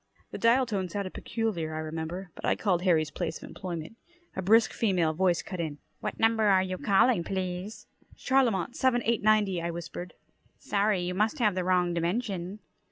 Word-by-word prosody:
The - - -6
dial 240 +3 +4
tone 195 -6 -2
sounded 195 +1 -4
peculiar, 175 -9 -3
I - - -3
remember, 160 +3 -5
but - - -12
I - - +2
called 185 -5 0
Harry's 160 -5 +2
place 170 -2 -3
of - - -11
employment. 175 +2 -6 0.4
A 190 - -2
brisk 220 +4 +4
female 180 -8 +1
voice 175 0 +1
cut 185 -4 -7
in: 155 -3 -3 0.2
"What - - -4
number 225 -1 +3
are 190 -2 +5
you 185 -1 -4
calling, 200 -1 +3
please?" 185 +2 -4 0.3
"CHarlemont 245 -6 +1
7 245 -2 +2
890," 215 -5 +2
I 170 - -2
whispered. 170 +1 -7 0.4
"Sorry. 200 -2 +1
You 175 +1 -2
must 215 +3 +1
have 215 -5 +2
the 185 0 -1
wrong 180 -1 +2
dimension." 185 +2 -2
185 Hz, 175 wpm, -28 LUFS, 175-215 Hz, 0.4 s, are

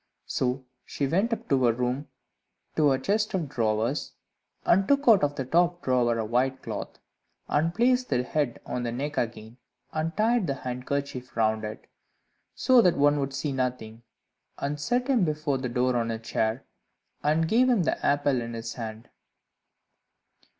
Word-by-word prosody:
So 130 +1 -1 0.2
she 140 - -3
went 190 - +1
up 230 - -3
to 135 -2 +3
her 120 - +4
room 125 +4 -2 0.7
to 155 -2 +4
her 135 - +3
chest 210 +5 0
of 170 -5 -1
drawers, 115 +1 -1 0.5
and 190 +2 +4
took 280 0 +2
out 215 -8 +7
of 145 0 +1
the 135 - -3
top 175 +5 +2
drawer 120 -2 +2
a 110 - -1
white 130 +4 0
cloth, - - -6 0.5
and 160 +3 +1
placed 250 +3 +2
the 125 -2 +1
head 145 -1 -1
on 125 - -3
the 120 -1 -2
neck 145 +5 -2
again, 115 0 -4 0.4
and 160 +3 -2
tied 225 -2 +2
the 140 - -1
handkerchief 125 0 -4
round 110 -1 +1
it, 105 0 -6 0.7
so 255 -2 +5
that 180 -5 +3
one 145 +1 +4
could 140 -1 -2
see 150 - -2
nothing, 125 -4 -3 0.6
and 145 +1 -3
set 245 - 0
him 255 -7 +3
before 150 -4 -1
the 130 -1 -3
door 125 +1 +1
on 115 -1 0
a 115 - -2
chair, 110 +2 -2 0.6
and 155 +2 +2
gave 245 +7 +4
him 230 -8 +3
the - - -1
apple 145 -3 +2
in 115 0 -5
his 115 0 -5
hand. 110 -1 -7
135 Hz, 170 wpm, -27 LUFS, 120-165 Hz, 0.7 s, out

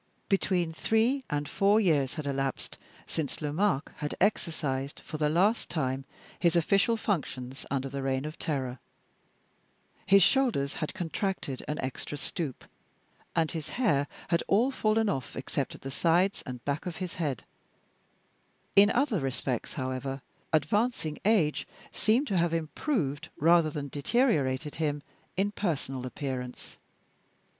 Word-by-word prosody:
Between 185 -4 +1
three 230 +9 +2
and 145 0 -1
four 200 +2 +4
years 150 -10 +2
had 155 -3 -4
elapsed 135 -1 -2 0.3
since 155 -4 -3
Lomaque 155 +1 0
had 150 -1 -3
exercised, 150 -8 0
for 155 - -7
the 150 -1 +3
last 195 +9 +2
time, 135 -4 -1 0.3
his 170 -1 +3
official 200 +7 +3
functions 135 - -3
under 135 0 -1
the 135 +1 -4
Reign 135 +1 0
of 155 +2 -6
Terror. 130 -5 -2 1.3
His 195 -1 +7
shoulders 235 - +2
had 155 - -3
contracted 175 - -2
an 150 - -2
extra 130 +2 -4
stoop, 145 -1 -4 0.7
and 160 -2 +2
his 155 -2 -5
hair 145 - +3 0.2
had 170 -1 +3
all 235 +7 +4
fallen 220 -3 +2
off, 135 -11 -2
except 135 +1 -3
at - - -13
the 135 - -5
sides 175 +6 +2
and 125 -2 -7
back 145 +5 -1
of 175 - -4
his 185 -2 -4
head. 145 -6 -1 1.3
In 200 +1 +8
some 240 - +1
other 255 -9 +2
respects, 130 0 -2
however, 130 0 -3 0.3
advancing 205 -1 +1
age 195 -9 +3 0.2
seemed 230 +7 +2
to 195 -9 0
have 170 -1 +2
improved 155 - -1
rather 165 +1 +5
than 145 -1 -4
deteriorated 145 - +1
him 145 -2 0 0.3
in 200 +2 +2
personal 135 -10 -2
appearance. 125 -2 -5
155 Hz, 140 wpm, -29 LUFS, 135-195 Hz, 1.3 s, In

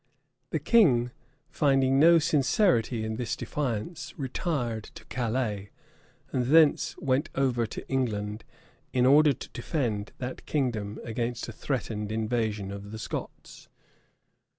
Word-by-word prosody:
The - - -1
king, 130 - +4 0.4
finding 135 -2 +3
no 170 +3 +7
sincerity 135 - +2
in 110 0 -3
this 120 -2 -2
defiance, 145 +3 -4
retired 130 - -2
to - - -11
Calais, 115 -5 -2 0.6
and 125 -2 0
thence 155 +1 +4
went 135 +3 0
over 125 -4 +1
to - - -8
England, 110 -5 -2 0.5
in 125 -1 +3
order 145 +3 +6
to - - -10
defend 120 -6 -2
that 130 0 -6
kingdom 115 -8 -1
against 120 +1 -3
a - - -5
threatened 110 -3 -3
invasion 110 -3 -1
of 100 0 -7
the 110 - -6
Scots. 110 - -7
125 Hz, 125 wpm, -28 LUFS, 110-140 Hz, 0.6 s, no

